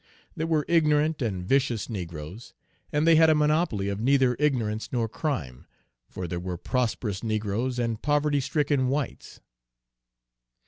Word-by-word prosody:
There 160 - -2
were 155 -3 +1
ignorant 155 -2 +2
and 95 -7 -2
vicious 130 -4 +1
negroes, 85 0 -7 0.4
and 150 +1 +1
they 165 -1 +6
had 160 0 +6
a 155 - +5
monopoly 150 - +1
of 100 0 -2
neither 130 +1 +3
ignorance 115 -7 0
nor 120 -3 0
crime, 110 - -4 0.4
for 90 -1 -5
there 85 +1 -3
were 90 0 -4
prosperous 110 -2 -2
negroes 110 +3 -1
and 115 -3 -2
poverty 145 0 +1
stricken 140 -1 0
whites. 140 +1 -4
125 Hz, 140 wpm, -26 LUFS, 105-150 Hz, 0.4 s, they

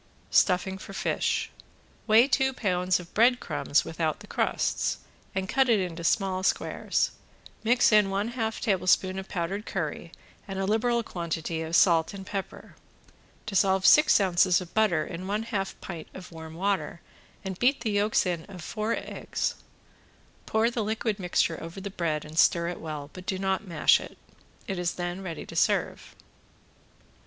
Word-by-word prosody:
~STUFFING 190 +1 +2
FOR 195 - -10
FISH~ - - -1 0.6
Weigh 225 +4 +6
two 265 -1 +2
pounds 180 -5 +1
of 175 -1 -12
breadcrumbs 245 +3 +2
without - - -2
the - - -10
crusts, - - 0 0.4
and 190 0 -1
cut 265 +4 +2
it 225 -3 +4
into 175 -2 -4
small 185 +1 +1
squares, 190 - 0 0.5
mix 240 +2 +4
in 210 -2 +5
one 200 +3 -1
half 225 -2 -3
tablespoon 185 -1 +2
of 190 - -9
powdered 190 +3 -3
curry 170 -2 -4 0.4
and 195 -1 -5
a 195 - -1
liberal 235 +3 +1
quantity 165 -4 -4
of 160 +1 -2
salt 170 0 +4
and 195 -1 -8
pepper. 195 0 -6 0.7
Dissolve 195 -2 +2
six 300 -5 +7
ounces 185 -2 +3
of 180 -2 -9
butter 200 -8 +2
in 180 +2 -7
one 210 +2 -1
half 205 -4 -3
pint 170 -4 -7
of 185 -1 -10
warm 160 -1 -9
water 180 -3 -1 0.5
and 190 -1 -5
beat 260 +3 +4
in - - -23
the 225 -3 -1
yolks 205 +1 +2
of 180 0 -4
four 215 +8 -2
eggs. - - -3 0.9
Pour 220 +2 +2
the 235 -2 -2
liquid 220 0 -2
mixture 175 -2 0
over 165 +3 -7
the 200 +1 -6
bread 160 -5 -2
and 155 +2 -3
stir 170 0 +4
it 175 - -6
well, 150 -2 -6
but 185 0 -11
do 190 - -1
not 190 +1 -1
mash 165 -4 +4
it. - - -10 0.5
It 190 -2 -3
is 175 -1 -1
then 175 +1 -4
ready 170 -5 -6
to - - -10
serve. - - 0
190 Hz, 165 wpm, -27 LUFS, 170-215 Hz, 0.9 s, six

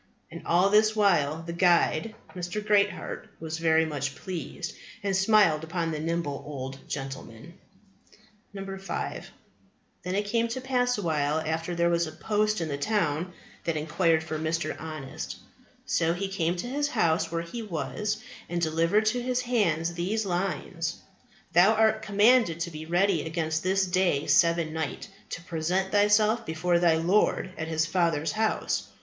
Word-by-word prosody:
And - - -8
all 180 +4 +4
this 215 +1 +4
while 165 -7 +2
the 170 0 -5
guide, 175 +3 +2 0.2
Mr. 180 +3 -3
Greatheart, 205 +1 +1
was 160 0 -5
very 160 0 +3
much 140 -3 -3
pleased, 180 -3 -6 0.3
and 195 -1 0
smiled 190 -6 +4
upon 165 0 -2
the 155 - -3
nimble 160 -3 -2
old 135 -2 -6
gentleman. 135 +1 -7 1.0
5. 195 -1 -5 0.7
"Then 180 +1 -3
it 205 +1 0
came 230 +3 +1
to 235 +3 -4
pass 250 -2 +1
a 205 - -4
while 150 -2 +1
after 160 +2 -2
that - - -5
there 170 0 +3
was 170 -1 +1
a - - -6
post 210 +4 0
in 165 - -1
the 140 -2 -3
town 175 -2 0 0.3
that 165 -2 0
inquired 160 +1 +1
for 155 -1 -4
Mr. 160 0 -1
Honest. 155 -4 -6 0.5
So 165 0 +1
he 195 +2 -3
came 175 -3 0
to 180 - -4
his 290 +3 0
house 165 - +1
where 165 0 -2
he 170 +8 -6
was, 210 +2 -3 0.3
and 175 0 -1
delivered 165 +6 +2
to 245 +3 +1
his 250 0 0
hands 175 -10 +1
these 200 +6 -1
lines, 175 -2 -2 0.6
Thou 190 +6 +6
art 220 0 +3
commanded 210 -4 +4
to 170 0 -2
be 155 0 -8
ready 175 0 +2
against 160 -1 -2
this 190 +1 +2
day 180 -5 +1
seven 165 -2 +3
night, 160 -4 -4 0.2
to 170 - -6
present 180 +3 -1
thyself 210 +2 +4
before 170 +2 +1
thy 170 -2 +4
Lord 185 +3 +2
at 160 - -4
His 160 0 +1
Father's 165 -2 +1
house. 220 0 -1
170 Hz, 160 wpm, -27 LUFS, 160-205 Hz, 1.0 s, Thou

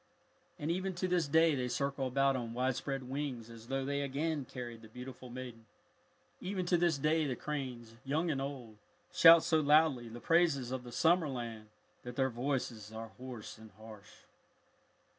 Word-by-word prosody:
And 150 +3 -2
even 185 +1 -2
to 185 +1 -1
this 175 -4 +1
day 160 +2 +5
they 130 -3 -1
circle 140 +1 -1
about 135 +1 +2
on 120 -2 -4
widespread 130 +2 -1
wings 130 -4 -4
as 115 0 -12
though 135 +1 -1
they 140 +1 -1
again 145 +1 -1
carried 120 -2 -7
the 110 - -12
beautiful 125 +2 -9
maiden. 120 -2 -8 0.7
Even 185 0 -3
to 175 - +3
this 170 -3 +2
day 155 +2 +2
the 130 - -1
cranes, 125 -7 -5
young 155 +5 0
and 135 -2 -2
old, 130 -6 -6 0.4
shout 165 -2 +9
so 160 -2 +3
loudly 150 -5 +4
the 115 +2 -8
praises 160 -6 +2
of 130 -1 -3
the 120 - -9
summer 165 +4 +3
land 115 -4 -5 0.3
that 125 0 -8
their 130 0 +1
voices 120 -4 -3
are 110 0 -7
hoarse 125 -4 -8
and 110 0 -12
harsh. 110 -2 -13
135 Hz, 175 wpm, -33 LUFS, 120-155 Hz, 0.7 s, shout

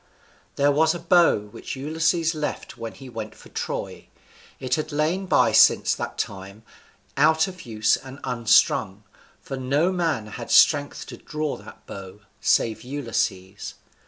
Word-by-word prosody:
There 145 +1 +3
was 160 +4 +3
a - - -5
bow 170 0 +4
which 105 +5 -8
Ulysses 160 +4 0
left 150 -1 -4
when 115 -1 -7
he 135 - -11
went 115 -3 -7
for - - -16
Troy. - - -5 0.5
It 130 -1 -3
had 155 +3 -1
lain 160 +6 0
by - - +4
since - - +5
that - - -5
time, 100 +2 -6 0.5
out 160 +3 +4
of 185 -7 -10
use 110 -1 +2
and 135 +1 -11
unstrung, 110 -4 +2 0.4
for 135 - -6
no 140 +7 +1
man 165 - -1
had 115 +2 -8
strength 145 -2 +4
to - - -10
draw 155 -1 -4
that 105 +2 -14
bow, 100 +1 -10 0.2
save 110 -2 +1
Ulysses. 115 -8 -3
135 Hz, 150 wpm, -24 LUFS, 110-160 Hz, 0.5 s, since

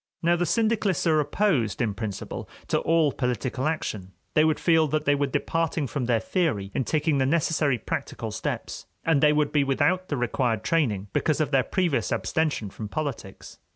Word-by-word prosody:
Now 170 +1 +4
the 175 0 0
syndicalists 220 -5 +1
are 160 -2 +4
opposed 145 - +1
in 115 -4 0
principle 105 -2 -5 0.2
to - - +2
all 160 -2 +2
political 125 +2 -2
action; 105 - -3 0.2
they 155 - +5
would 155 -1 +2
feel 160 -2 +3
that 150 +1 -1
they 145 - +4
were 145 0 +1
departing 165 +2 -1
from 135 -1 -3
their 120 -2 +2
theory 110 - -1
in 130 - -1
taking 150 -2 +1
the 130 - +2
necessary 150 -3 +1
practical - - -4
steps, - - -4 0.2
and 160 -4 +3
they 150 - +6
would 150 -1 +1
be 145 -2 +3
without 180 +7 +1
the 145 - -2
required 120 -2 0
training 110 -12 0
because 155 -1 +1
of 150 -2 0
their 135 -2 +4
previous 145 - 0
abstention 105 +2 -1
from 105 +1 -7
politics. 140 -9 -6
145 Hz, 185 wpm, -26 LUFS, 120-160 Hz, 0.2 s, they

